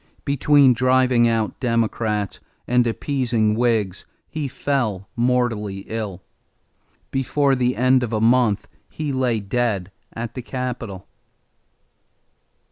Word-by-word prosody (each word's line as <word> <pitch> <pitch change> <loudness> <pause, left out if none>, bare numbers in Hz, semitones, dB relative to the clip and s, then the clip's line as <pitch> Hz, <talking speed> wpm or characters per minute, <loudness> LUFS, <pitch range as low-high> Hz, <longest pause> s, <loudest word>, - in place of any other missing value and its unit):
Between 140 -1 +4
driving 125 -1 +3
out 115 -2 -1
Democrats 110 -4 -1 0.3
and 125 0 +3
appeasing 115 -3 0
Whigs, 110 -5 0 0.2
he 155 -3 -4
fell 120 -8 -2
mortally 115 -5 0
ill. 105 -5 -5 0.9
Before 135 +1 +1
the 125 -1 +1
end 130 +1 +3
of 120 -2 -3
a 110 - 0
month 115 -2 +3 0.2
he 150 -3 -4
lay 125 -4 +1
dead 100 -3 -1 0.2
at 115 0 -5
the 130 - -5
capitol. 120 -4 -5
120 Hz, 110 wpm, -22 LUFS, 110-130 Hz, 0.9 s, Between